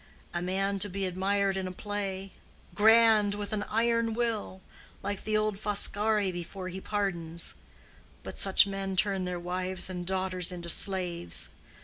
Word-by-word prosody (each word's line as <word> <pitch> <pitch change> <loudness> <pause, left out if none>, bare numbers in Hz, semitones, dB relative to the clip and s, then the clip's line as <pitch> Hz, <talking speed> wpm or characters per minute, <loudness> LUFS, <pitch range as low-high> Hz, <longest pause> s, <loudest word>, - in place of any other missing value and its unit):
A 175 - -2
man 195 +2 -1
to 205 - +1
be 195 +1 -3
admired 195 +1 0
in 190 -1 -2
a - - -5
play—grand, 205 +2 +1
with 205 0 -4
an 210 - -1
iron 230 0 +1
will. 225 -5 -2 0.4
Like 200 0 -3
the 215 0 +2
old 215 -2 -1
Foscari 210 -1 +2
before 180 +2 -6
he 190 +1 -7
pardons. 175 -6 -3 0.7
But - - -7
such 195 0 +5
men 195 -1 -3
turn 195 -1 +1
their 180 -1 -3
wives 185 +1 -1
and 180 -1 -4
daughters 185 -1 -1
into 170 -1 -6
slaves. 180 -2 +3
195 Hz, 145 wpm, -29 LUFS, 185-205 Hz, 0.7 s, such